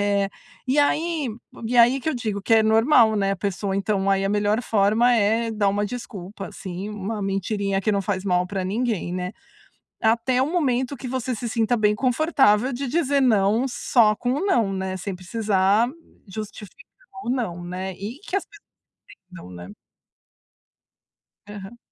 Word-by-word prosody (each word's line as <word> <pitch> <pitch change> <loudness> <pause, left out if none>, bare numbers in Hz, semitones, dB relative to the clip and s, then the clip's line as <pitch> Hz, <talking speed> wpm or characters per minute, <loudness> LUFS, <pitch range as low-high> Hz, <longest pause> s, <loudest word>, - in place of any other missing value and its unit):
É, 200 -1 +1 0.4
e 260 +3 +1
aí, 305 0 +1 0.4
e 245 +2 -1
aí 245 +3 +6
que 290 - -3
eu 315 - 0
digo 215 -5 -3
que 225 - -1
é 220 - +5
normal, 225 +1 +4
né, 195 -1 +1
a - - -3
pessoa 195 0 -2
então, 195 -1 0
aí 195 0 +2
a - - +1
melhor 205 +2 +1
forma 220 +4 +3
é 225 +1 +2
dar 210 -2 +1
uma 205 +1 0
desculpa, 200 -4 -7
assim, 185 +2 -7
uma 210 +1 -4
mentirinha 195 0 -1
que 210 +2 0
não 200 -1 0
faz 190 -1 -2
mal 180 -2 +2
pra 190 0 -3
ninguém, 210 -2 -1
né. 180 +1 -3 0.7
Até 235 +3 +2
o 285 - -1
momento 270 -6 0
que 255 - -8
você 255 0 -2
se 235 +1 -4
sinta 230 +1 +1
bem 210 -2 +2
confortável 260 -2 +2
de 260 +2 -3
dizer 285 -1 +1
"não" 225 0 +3
só 220 -3 +3
com 245 - -2
um 290 +8 -1
"não", 230 - +2
né, 190 -1 -3
sem 190 +1 -5
precisar 205 +3 +1 0.4
justificar 215 +5 -9 0.4
o 240 - -2
"não", 205 -10 -2
né. 185 +2 -5
E 210 +9 -7
que - - -6
as 395 - -1
pessoas - - -18 0.7
entendam, 170 - -11
né. 90 +3 -10 1.7
Aham. 205 +2 -9
215 Hz, 170 wpm, -23 LUFS, 195-245 Hz, 1.7 s, aí